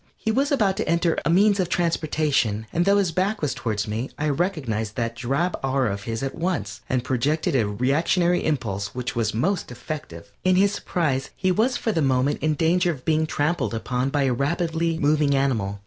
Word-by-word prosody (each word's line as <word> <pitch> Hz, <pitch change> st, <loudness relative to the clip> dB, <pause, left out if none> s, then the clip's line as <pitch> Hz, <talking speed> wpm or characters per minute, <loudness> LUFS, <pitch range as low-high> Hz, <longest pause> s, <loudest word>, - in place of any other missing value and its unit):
He 220 Hz, -, -1 dB
was 275 Hz, +6 st, +1 dB
about 210 Hz, -9 st, +2 dB
to -, -, -2 dB
enter 170 Hz, 0 st, +2 dB
a -, -, -3 dB
a -, -, +2 dB
means 200 Hz, +4 st, +4 dB
of 180 Hz, -2 st, 0 dB
transportation, 150 Hz, -, 0 dB
and 170 Hz, +1 st, +2 dB
though 200 Hz, +1 st, +4 dB
his 195 Hz, -4 st, +1 dB
back 195 Hz, +5 st, 0 dB
was 150 Hz, -, -1 dB
towards 105 Hz, -3 st, -2 dB
me, 110 Hz, +5 st, -3 dB
I 150 Hz, 0 st, 0 dB
recognized 135 Hz, -, -1 dB
that 115 Hz, -1 st, -2 dB
drab 135 Hz, +9 st, -1 dB
aura 130 Hz, -5 st, +1 dB
of 100 Hz, 0 st, -7 dB
his 115 Hz, +2 st, -3 dB
at 135 Hz, -, -2 dB
once, 165 Hz, -, -3 dB
and 130 Hz, -2 st, 0 dB
projected 140 Hz, +4 st, 0 dB
a 115 Hz, -5 st, +2 dB
reactionary 160 Hz, -, +1 dB
impulse 100 Hz, -10 st, -2 dB
which 125 Hz, 0 st, -3 dB
was 110 Hz, -2 st, 0 dB
most 180 Hz, -, 0 dB
effective. 125 Hz, -, -7 dB
In 185 Hz, 0 st, +3 dB
his 195 Hz, +2 st, +4 dB
surprise 135 Hz, -10 st, -1 dB
he 185 Hz, 0 st, +1 dB
was 230 Hz, +7 st, +2 dB
for 225 Hz, -, -1 dB
the 165 Hz, -, 0 dB
moment 135 Hz, +1 st, +1 dB
in 155 Hz, 0 st, +1 dB
danger 175 Hz, +3 st, +2 dB
of 140 Hz, -7 st, -4 dB
being 160 Hz, 0 st, +2 dB
trampled 150 Hz, -4 st, -1 dB
upon 125 Hz, +3 st, -1 dB
by 145 Hz, 0 st, +1 dB
a 130 Hz, -2 st, +2 dB
rapidly 165 Hz, +4 st, 0 dB
moving 150 Hz, -1 st, +2 dB
animal. 110 Hz, -8 st, 0 dB
150 Hz, 205 wpm, -24 LUFS, 125-175 Hz, -, means